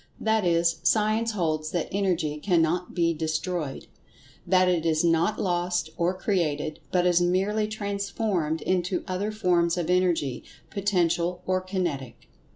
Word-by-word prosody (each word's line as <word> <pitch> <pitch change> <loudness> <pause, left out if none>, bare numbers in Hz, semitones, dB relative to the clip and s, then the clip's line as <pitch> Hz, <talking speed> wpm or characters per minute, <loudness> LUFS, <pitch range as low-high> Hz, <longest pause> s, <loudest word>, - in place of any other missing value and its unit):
That 220 -1 +1
is, 170 -1 +2
Science 220 +3 +2
holds 155 -5 -1
that 175 -1 -2
Energy 175 -6 0
can 175 +1 +2
not 170 +3 0
be 170 -2 +2
destroyed—that 160 +3 -2
it 175 -3 +1
is 160 -1 +1
not 170 +5 +2
lost, 175 -3 -1
or 175 +2 0
created, 155 -6 -1
but 180 -1 +2
is 175 -1 +4
merely 195 +5 +1
transformed 200 -5 -2
into 180 0 0
other 190 +3 -2
forms 180 -5 +1
of 175 0 -1
Energy, 175 -8 +1 0.3
Potential 180 -3 0
or 185 0 +1
Kinetic. 175 -9 -4
180 Hz, 135 wpm, -26 LUFS, 165-190 Hz, 0.3 s, is